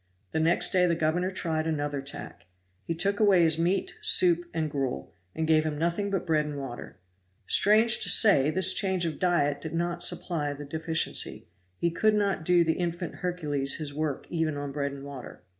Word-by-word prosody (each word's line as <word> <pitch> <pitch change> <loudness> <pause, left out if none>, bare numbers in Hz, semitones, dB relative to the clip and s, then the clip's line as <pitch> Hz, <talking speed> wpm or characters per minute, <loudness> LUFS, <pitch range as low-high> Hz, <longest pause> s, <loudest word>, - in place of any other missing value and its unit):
The - - -1
next 165 +2 +3
day 180 -2 +3
the 170 - +1
governor 165 +3 0
tried 160 -4 -3
another 145 -3 -2
tack. 140 -8 -9 0.4
He 165 - -3
took 200 +4 0
away 200 -5 +4
his 160 -1 +3
meat 180 +3 0
soup 175 -1 +3
and 160 -1 -2
gruel, 130 - -4 0.2
and 160 - -1
gave 155 -1 +3
him 155 -1 -3
nothing 170 +5 -1
but 195 -2 -2
bread 155 -3 +1
and 150 -1 -6
water. 135 -3 -8 0.5
Strange 220 - +3
to - - +2
say, 155 -10 +5
this 185 +3 +4
change 190 -3 0
of 160 - -4
diet 145 -6 +1
did 160 +1 -6
not 175 +1 -2
supply 150 -5 0
the 145 +1 -9
deficiency; 160 - -1 0.3
he 170 - 0
could 215 +5 +2
not 200 -5 0
do 175 +1 +3
the 160 -1 +1
infant 175 -1 -4
Hercules 150 -6 -3
his 150 -3 -7
work 150 -2 -3
even 160 -3 -1
on 145 -1 -5
bread 140 0 -3
and 140 0 -9
water. 140 -3 -10
160 Hz, 190 wpm, -27 LUFS, 145-180 Hz, 0.5 s, say